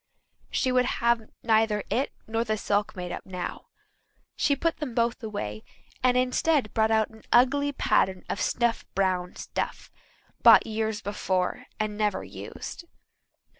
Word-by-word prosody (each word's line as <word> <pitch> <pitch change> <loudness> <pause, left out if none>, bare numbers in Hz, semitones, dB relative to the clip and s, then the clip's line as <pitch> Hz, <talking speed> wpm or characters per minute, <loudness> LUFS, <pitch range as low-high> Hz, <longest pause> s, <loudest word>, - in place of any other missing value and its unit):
She 260 - +1
would 250 0 +3
have 235 -2 +1
neither 220 -2 +3
it 265 +3 +1
nor 225 +1 -1
the 215 -1 -1
silk 205 0 0
made 180 -1 -5
up - - -5
now. 180 -2 -6 0.7
She 285 - +2
put 330 +3 0
them 260 -6 -5
both 235 +2 +1
away 155 - -4 0.4
and 250 0 +3
instead 255 -1 +2
brought 220 0 +3
out 220 -1 +2
an 220 0 -15
ugly 285 +4 +4
pattern 190 -8 +1
of - - -3
snuff 235 -1 +1
brown 185 -2 0
stuff, - - -4 0.5
bought - - +8
years 220 -1 -2
before 190 -3 -1
and 215 -1 -2
never 210 -1 0
used. 340 - -8
220 Hz, 145 wpm, -27 LUFS, 205-250 Hz, 0.7 s, bought